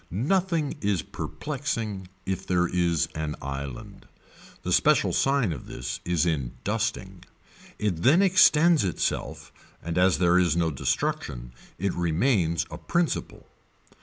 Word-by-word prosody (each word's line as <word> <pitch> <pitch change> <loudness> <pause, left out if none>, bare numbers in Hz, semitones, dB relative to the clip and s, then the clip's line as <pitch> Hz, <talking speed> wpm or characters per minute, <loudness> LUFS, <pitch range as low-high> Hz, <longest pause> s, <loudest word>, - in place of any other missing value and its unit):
Nothing 160 - 0
is 100 -6 0
perplexing 115 - -4 0.2
if 95 -1 -3
there 90 -1 +2
is 85 -3 +1
an 80 -1 -3
island. 70 -2 -7 0.6
The - - -1
special - - +3
sign 135 -9 +2
of - - -9
this 60 +1 -5
is 85 -1 +1
in 70 -8 -1
dusting. - - -3 0.5
It 95 -6 -1
then 160 - +5
extends 170 - +5
itself 90 -4 -3 0.3
and 85 +1 -2
as 90 0 +4
there 90 0 +4
is 85 -3 +2
no 85 -2 +1
destruction - - -2 0.3
it 95 +1 -1
remains 85 - +1
a - - -7
principle. 170 -1 -2
90 Hz, 130 wpm, -26 LUFS, 80-135 Hz, 0.6 s, then